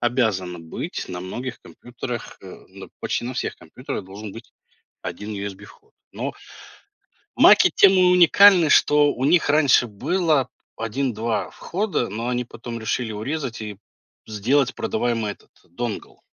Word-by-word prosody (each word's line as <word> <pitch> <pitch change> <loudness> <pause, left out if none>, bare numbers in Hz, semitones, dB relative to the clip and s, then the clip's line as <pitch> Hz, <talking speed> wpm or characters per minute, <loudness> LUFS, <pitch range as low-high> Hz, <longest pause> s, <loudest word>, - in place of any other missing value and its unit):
обязано 110 -8 0
быть 80 -1 -6
на 90 -1 -5
многих 125 +7 -6
компьютерах, 120 0 -8
э, 95 - -13 0.2
ну, - - -12
почти - - -2
на 130 - -5
всех - - -3
компьютерах 125 -5 -7
должен 100 +2 -9
быть 115 0 -12 0.5
1 100 +5 -6
USB-вход. 100 -1 -9 0.2
Но - - -3 1.1
"Маки" - - +7
тем 195 -1 +7
и 185 -1 +4
уникальны, 180 -1 +6
что 145 0 +5
у 130 - -4
них 160 0 +3
раньше 145 -4 +4
было 145 - 0 0.3
1-2 115 -1 -2
входа, 190 - -2
но 115 +4 -4
они 125 0 -1
потом 115 0 -8
решили 110 +1 -2
урезать 120 +1 -4
и 105 -2 -6 0.5
сделать 125 +6 +1
продаваемый 115 -2 -1
этот - - -20 0.2
dongle 110 +5 -6
120 Hz, 135 wpm, -22 LUFS, 105-140 Hz, 1.1 s, Маки